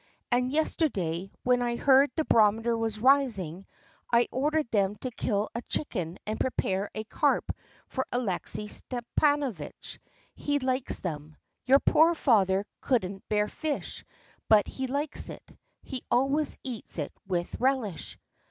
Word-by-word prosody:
And 250 Hz, +1 st, +2 dB
yesterday, 195 Hz, -, -1 dB
when 250 Hz, 0 st, +3 dB
I 240 Hz, -1 st, 0 dB
heard 275 Hz, +3 st, +5 dB
the 315 Hz, -, 0 dB
barometer 225 Hz, +2 st, +3 dB
was 225 Hz, -1 st, -2 dB
rising, 215 Hz, -, +2 dB, 0.4 s
I 235 Hz, 0 st, +4 dB
ordered 295 Hz, 0 st, 0 dB
them 200 Hz, -2 st, +2 dB
to 255 Hz, -, -3 dB
kill 210 Hz, -2 st, -1 dB
a 235 Hz, -, -3 dB
chicken 180 Hz, -, -2 dB
and 215 Hz, +1 st, -3 dB
prepare 200 Hz, -6 st, -1 dB
a 215 Hz, -, -3 dB
carp 220 Hz, -, +1 dB, 0.4 s
for 260 Hz, -, -3 dB
Alexey 210 Hz, -2 st, -1 dB
Stepanovitch. 250 Hz, -, -2 dB, 0.3 s
He 290 Hz, 0 st, -1 dB
likes 260 Hz, -1 st, 0 dB
them. 155 Hz, -3 st, -5 dB, 0.3 s
Your 265 Hz, +3 st, +7 dB
poor 325 Hz, +4 st, +4 dB
father 200 Hz, -, +3 dB
couldn't 195 Hz, -7 st, -1 dB
bear 210 Hz, 0 st, +2 dB
fish, 310 Hz, +3 st, -4 dB, 0.5 s
but 210 Hz, -2 st, +6 dB
he 265 Hz, 0 st, -4 dB
likes 285 Hz, +3 st, -2 dB
it. -, -, -11 dB, 0.3 s
He 260 Hz, -3 st, -6 dB
always 275 Hz, +4 st, +2 dB
eats 245 Hz, -8 st, -2 dB
it 150 Hz, -, -3 dB
with 175 Hz, -2 st, -2 dB
relish." 255 Hz, -9 st, -1 dB
235 Hz, 135 wpm, -28 LUFS, 200-270 Hz, 0.5 s, Your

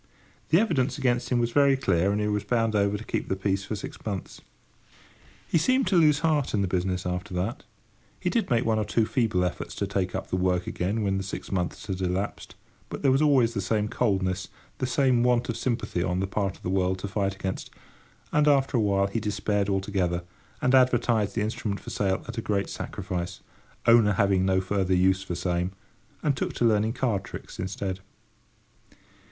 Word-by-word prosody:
The 165 Hz, -, +5 dB
evidence 140 Hz, -, +1 dB
against 125 Hz, -3 st, 0 dB
him 125 Hz, -, +2 dB
was 120 Hz, 0 st, +1 dB
very 140 Hz, 0 st, +4 dB
clear, 95 Hz, -6 st, +2 dB
and 105 Hz, -, 0 dB
he 105 Hz, -, 0 dB
was 105 Hz, -1 st, 0 dB
bound 115 Hz, 0 st, +1 dB
over 100 Hz, 0 st, +2 dB
to 105 Hz, -, -8 dB
keep -, -, -3 dB
the 95 Hz, -, +1 dB
peace 95 Hz, 0 st, -1 dB
for 110 Hz, -, -3 dB
six -, -, -8 dB
months. 100 Hz, -4 st, -5 dB, 1.1 s
He 165 Hz, -, +2 dB
seemed 255 Hz, -, +2 dB
to 195 Hz, -, +2 dB
lose 150 Hz, -3 st, +5 dB
heart 150 Hz, -7 st, +1 dB
in 100 Hz, -, +1 dB
the -, -, 0 dB
business 90 Hz, 0 st, -1 dB
after 90 Hz, +1 st, -3 dB
that. 95 Hz, +7 st, -3 dB, 0.5 s
He 180 Hz, -, -1 dB
did 230 Hz, -, 0 dB
make 120 Hz, -3 st, +2 dB
one 110 Hz, -1 st, +2 dB
or -, -, +1 dB
two 110 Hz, +2 st, +1 dB
feeble 110 Hz, -7 st, +1 dB
efforts 90 Hz, -, -3 dB
to 100 Hz, -, -1 dB
take 95 Hz, -2 st, -2 dB
up 95 Hz, -, -5 dB
the 95 Hz, -, +1 dB
work 90 Hz, -1 st, +1 dB
again 100 Hz, +5 st, -2 dB
when 95 Hz, -1 st, +1 dB
the 95 Hz, -, -2 dB
six 95 Hz, -, -6 dB
months 90 Hz, -3 st, -2 dB
had 95 Hz, -1 st, -4 dB
elapsed, 95 Hz, +2 st, -3 dB, 0.3 s
but -, -, -6 dB
there 135 Hz, -, +5 dB
was 135 Hz, +2 st, +3 dB
always 135 Hz, -6 st, +4 dB
the 100 Hz, -, -1 dB
same 105 Hz, +2 st, 0 dB
coldness—the 100 Hz, +2 st, -2 dB
same 130 Hz, -1 st, +3 dB
want 125 Hz, 0 st, +2 dB
of 115 Hz, -, -1 dB
sympathy 115 Hz, -7 st, -2 dB
on 90 Hz, 0 st, 0 dB
the 95 Hz, -, 0 dB
part 95 Hz, -1 st, -2 dB
of -, -, -23 dB
the 90 Hz, -, -2 dB
world 95 Hz, 0 st, +1 dB
to 95 Hz, -, -5 dB
fight 100 Hz, -1 st, -1 dB
against; 95 Hz, -1 st, -4 dB, 0.6 s
and, 150 Hz, 0 st, +3 dB
after 135 Hz, -2 st, +3 dB
awhile, 100 Hz, -3 st, +2 dB
he 100 Hz, +4 st, -2 dB
despaired 105 Hz, -1 st, -1 dB
altogether, 95 Hz, -3 st, 0 dB, 0.4 s
and 125 Hz, -, +3 dB
advertised 120 Hz, -5 st, +3 dB
the 110 Hz, -, +1 dB
instrument 105 Hz, -2 st, -3 dB
for -, -, -9 dB
sale 95 Hz, -2 st, -1 dB
at -, -, -4 dB
a -, -, -2 dB
great 100 Hz, -3 st, -1 dB
sacrifice—"owner 105 Hz, +5 st, 0 dB
having 95 Hz, -1 st, +2 dB
no 95 Hz, 0 st, +3 dB
further 95 Hz, -1 st, 0 dB
use 95 Hz, +1 st, +3 dB
for 90 Hz, -3 st, -4 dB
same"—and 90 Hz, -, -3 dB
took -, -, -2 dB
to 120 Hz, -, 0 dB
learning 110 Hz, 0 st, +3 dB
card 120 Hz, -6 st, 0 dB
tricks -, -, -9 dB
instead. 95 Hz, 0 st, -3 dB
100 Hz, 200 wpm, -26 LUFS, 95-120 Hz, 1.1 s, The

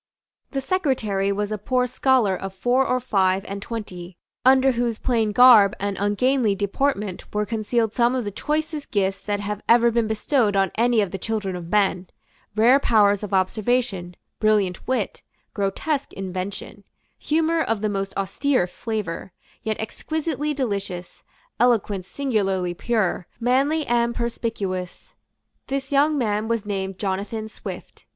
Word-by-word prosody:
The 275 Hz, -, -2 dB
secretary 250 Hz, -, 0 dB
was 205 Hz, +1 st, -2 dB
a 215 Hz, -, -2 dB
poor 250 Hz, +4 st, +1 dB
scholar 250 Hz, -5 st, +2 dB
of 195 Hz, +1 st, -6 dB
four 245 Hz, +6 st, +2 dB
or 255 Hz, -, +1 dB
five 195 Hz, -5 st, +1 dB
and 200 Hz, 0 st, -6 dB
twenty, 185 Hz, -6 st, -7 dB, 0.3 s
under 265 Hz, +1 st, +5 dB
whose 240 Hz, -2 st, -1 dB
plain 225 Hz, -4 st, +1 dB
garb 220 Hz, -3 st, +7 dB
and 200 Hz, 0 st, -2 dB
ungainly 215 Hz, +2 st, +2 dB
deportment 205 Hz, 0 st, -2 dB
were 210 Hz, 0 st, +1 dB
concealed 225 Hz, +1 st, -1 dB
some 240 Hz, +1 st, +2 dB
of 250 Hz, -3 st, -1 dB
the 205 Hz, -, -3 dB
choicest 305 Hz, +6 st, -3 dB
gifts 195 Hz, -1 st, 0 dB
that 205 Hz, 0 st, -2 dB
have 210 Hz, 0 st, -4 dB
ever 235 Hz, 0 st, +6 dB
been 230 Hz, -1 st, +1 dB
bestowed 220 Hz, 0 st, +1 dB
on 195 Hz, -2 st, +2 dB
any 235 Hz, -1 st, +3 dB
of 200 Hz, -3 st, -2 dB
the 195 Hz, -, -5 dB
children 210 Hz, -4 st, -2 dB
of 170 Hz, -2 st, -7 dB
men; 190 Hz, -2 st, +1 dB, 0.5 s
rare 240 Hz, +5 st, +5 dB
powers 205 Hz, -6 st, +3 dB
of 210 Hz, -2 st, -6 dB
observation, 195 Hz, -1 st, 0 dB, 0.2 s
brilliant 210 Hz, -4 st, +1 dB
wit, 260 Hz, -, -1 dB, 0.3 s
grotesque 220 Hz, +9 st, -2 dB
invention, 195 Hz, +2 st, -6 dB, 0.4 s
humour 325 Hz, +1 st, +1 dB
of 225 Hz, -8 st, -1 dB
the 215 Hz, -, +1 dB
most 195 Hz, -1 st, -2 dB
austere 250 Hz, +3 st, +1 dB
flavour, 190 Hz, -2 st, -5 dB, 0.3 s
yet 220 Hz, -1 st, -2 dB
exquisitely 300 Hz, +5 st, -3 dB
delicious, 200 Hz, -10 st, -4 dB, 0.4 s
eloquence 210 Hz, -6 st, +2 dB
singularly 195 Hz, -10 st, -1 dB
pure, 190 Hz, -3 st, -1 dB
manly 275 Hz, +6 st, +2 dB
and 235 Hz, 0 st, +1 dB
perspicuous. 210 Hz, -6 st, -4 dB, 0.5 s
This 275 Hz, 0 st, -3 dB
young 290 Hz, +2 st, +3 dB
man 215 Hz, -3 st, 0 dB
was 230 Hz, -2 st, -1 dB
named 195 Hz, -2 st, -3 dB
Jonathan 205 Hz, +3 st, -3 dB
Swift. 220 Hz, -, -9 dB
215 Hz, 145 wpm, -23 LUFS, 195-250 Hz, 0.5 s, garb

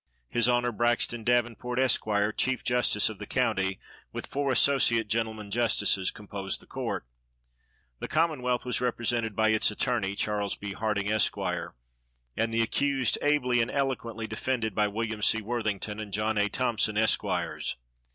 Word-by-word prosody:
His 120 Hz, 0 st, +3 dB
Honor, 120 Hz, 0 st, +2 dB
Braxton 120 Hz, 0 st, 0 dB
Davenport, 120 Hz, +1 st, 0 dB
Esq., 130 Hz, -3 st, +3 dB, 0.3 s
chief 130 Hz, -1 st, 0 dB
justice 125 Hz, -1 st, +2 dB
of -, -, -5 dB
the -, -, -7 dB
county, 95 Hz, 0 st, 0 dB, 0.3 s
with -, -, -4 dB
four 140 Hz, -1 st, -1 dB
associate 120 Hz, -4 st, +3 dB
gentlemen 110 Hz, -1 st, -2 dB
justices, 105 Hz, -4 st, +2 dB
composed 100 Hz, -2 st, -5 dB
the -, -, -16 dB
court. -, -, -4 dB, 0.9 s
The -, -, -4 dB
commonwealth 140 Hz, -7 st, 0 dB
was 125 Hz, 0 st, 0 dB
represented 120 Hz, -3 st, 0 dB
by 110 Hz, 0 st, +3 dB
its 110 Hz, -1 st, +3 dB
attorney, 105 Hz, -3 st, -1 dB
Charles 105 Hz, -1 st, -1 dB
B. 100 Hz, -1 st, -6 dB
Harding, 105 Hz, 0 st, -1 dB
Esq., 110 Hz, 0 st, +2 dB
and -, -, -5 dB
the 115 Hz, 0 st, +2 dB
accused 135 Hz, +1 st, +1 dB
ably 125 Hz, -5 st, +2 dB
and 115 Hz, -, 0 dB
eloquently 120 Hz, -5 st, -2 dB
defended 115 Hz, -2 st, -2 dB
by 105 Hz, +1 st, +2 dB
Wm. 110 Hz, +1 st, -3 dB
C. 110 Hz, +1 st, +4 dB
Worthington 110 Hz, -2 st, -3 dB
and 105 Hz, -2 st, -6 dB
John 105 Hz, +3 st, 0 dB
A. 105 Hz, 0 st, +2 dB
Thompson, 115 Hz, -4 st, 0 dB
Esqs. 95 Hz, -6 st, 0 dB
110 Hz, 150 wpm, -28 LUFS, 105-120 Hz, 0.9 s, C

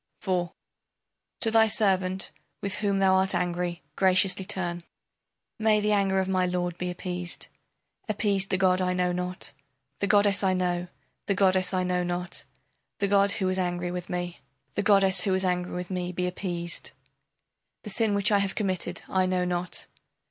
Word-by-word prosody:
IV 180 Hz, -2 st, 0 dB, 0.9 s
To 225 Hz, -, +5 dB
thy 225 Hz, 0 st, +5 dB
servant 190 Hz, -3 st, +2 dB, 0.3 s
with 200 Hz, -1 st, -3 dB
whom 200 Hz, -2 st, 0 dB
thou 190 Hz, -1 st, +4 dB
art 190 Hz, 0 st, +3 dB
angry 175 Hz, -2 st, -2 dB
graciously 190 Hz, 0 st, +3 dB
turn. 175 Hz, -3 st, -2 dB, 0.8 s
May 215 Hz, -1 st, +3 dB
the 210 Hz, 0 st, 0 dB
anger 195 Hz, -2 st, +2 dB
of 190 Hz, -, 0 dB
my 185 Hz, -1 st, +1 dB
lord 180 Hz, -1 st, -2 dB
be 180 Hz, -, -2 dB
appeased, 180 Hz, 0 st, -5 dB, 0.6 s
Appeased 200 Hz, -2 st, +1 dB
the 185 Hz, -, +1 dB
god 185 Hz, 0 st, +3 dB
I 180 Hz, 0 st, +1 dB
know 180 Hz, 0 st, +1 dB
not! 180 Hz, +1 st, -4 dB, 0.5 s
The 200 Hz, -, 0 dB
goddess 205 Hz, -1 st, +3 dB
I 190 Hz, -1 st, +3 dB
know, 180 Hz, -1 st, -1 dB, 0.4 s
the 200 Hz, -, +1 dB
goddess 185 Hz, -1 st, +2 dB
I 185 Hz, -1 st, 0 dB
know 180 Hz, 0 st, 0 dB
not, 175 Hz, 0 st, -4 dB, 0.5 s
The 200 Hz, -, 0 dB
god 200 Hz, 0 st, +4 dB
who 190 Hz, -, 0 dB
was 185 Hz, 0 st, 0 dB
angry 175 Hz, -1 st, -2 dB
with 180 Hz, -1 st, -5 dB
me, 175 Hz, -1 st, -4 dB, 0.3 s
The -, -, -1 dB
goddess 195 Hz, -2 st, +5 dB
who 195 Hz, -, +1 dB
was 190 Hz, 0 st, +1 dB
angry 180 Hz, 0 st, -1 dB
with 180 Hz, +1 st, -5 dB
me 180 Hz, -1 st, -2 dB
be 180 Hz, 0 st, -2 dB
appeased! 175 Hz, -2 st, -4 dB, 0.9 s
The 210 Hz, -, 0 dB
sin 215 Hz, 0 st, +2 dB
which 200 Hz, +1 st, +3 dB
I 205 Hz, -, +4 dB
have 195 Hz, -1 st, -1 dB
committed 185 Hz, -4 st, -1 dB
I 185 Hz, -1 st, +1 dB
know 185 Hz, -1 st, 0 dB
not. 180 Hz, 0 st, -3 dB
185 Hz, 175 wpm, -27 LUFS, 180-195 Hz, 0.9 s, To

